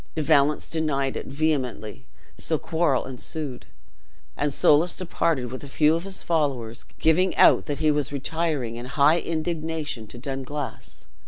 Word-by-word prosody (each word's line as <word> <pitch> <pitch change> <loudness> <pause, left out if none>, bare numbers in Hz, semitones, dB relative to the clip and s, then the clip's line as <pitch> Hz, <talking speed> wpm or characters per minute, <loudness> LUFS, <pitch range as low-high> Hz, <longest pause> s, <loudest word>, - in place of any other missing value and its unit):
De 155 - -1
Valence 150 -1 +3
denied 140 -4 -1
it - - -5
vehemently 135 -7 -2 0.3
so - - 0
quarrel 160 -5 0
ensued, 130 - -5 0.7
and 145 +1 0
Soulis 155 +5 +4
departed 165 -8 -1
with 130 - -7
a - - -7
few 150 +2 +3
of 165 +2 -2
his 195 -1 -6
followers, 135 -9 -1
giving 180 +4 +2
out - - +5
that 145 -2 -2
he 155 +1 +3
was 145 -2 -1
retiring 140 -4 -2
in 120 +1 -6
high 145 +4 +4
indignation 160 -7 -3
to 120 - -10
Dunglass. 135 +2 -6
145 Hz, 150 wpm, -25 LUFS, 135-160 Hz, 0.7 s, out